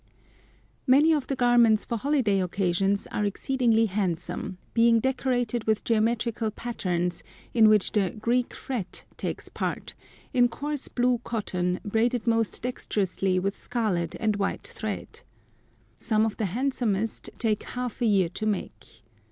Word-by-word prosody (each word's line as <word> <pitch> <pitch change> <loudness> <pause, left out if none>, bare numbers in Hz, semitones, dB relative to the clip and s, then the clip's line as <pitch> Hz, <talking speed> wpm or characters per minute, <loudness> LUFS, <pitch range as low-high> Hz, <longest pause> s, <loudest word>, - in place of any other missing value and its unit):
Many 290 +5 +6
of 290 -4 -1
the 275 - -1
garments 240 -3 +4
for 235 - -2
holiday 230 -6 +1
occasions 195 +2 0
are 210 - -1
exceedingly 230 +2 +2
handsome, 185 -2 -2 0.2
being 230 0 +5
decorated 245 -2 0
with 220 -1 +1
"geometrical" 230 0 +1
patterns, 180 -7 -2 0.3
in 220 -2 +6
which 210 -2 +3
the 200 -4 +2
"Greek 235 +4 0
fret" 235 -9 -5
takes - - -4
part, - - -4 0.4
in 245 -1 +5
coarse 285 +4 -4
blue 245 -1 +1
cotton, 180 -5 -2
braided 230 +3 +1
most 225 -2 +1
dexterously 195 -6 -1
with 195 +2 0
scarlet 190 -9 -1
and 215 -2 +1
white 200 -1 -2
thread. - - -6 0.8
Some 220 -1 +2
of 220 - -2
the 220 - 0
handsomest 225 -1 -1
take 220 -2 0
half 250 0 -5
a 235 - +3
year 195 -5 +3
to 215 +5 -4
make. 180 - -5
220 Hz, 135 wpm, -26 LUFS, 195-245 Hz, 0.8 s, Many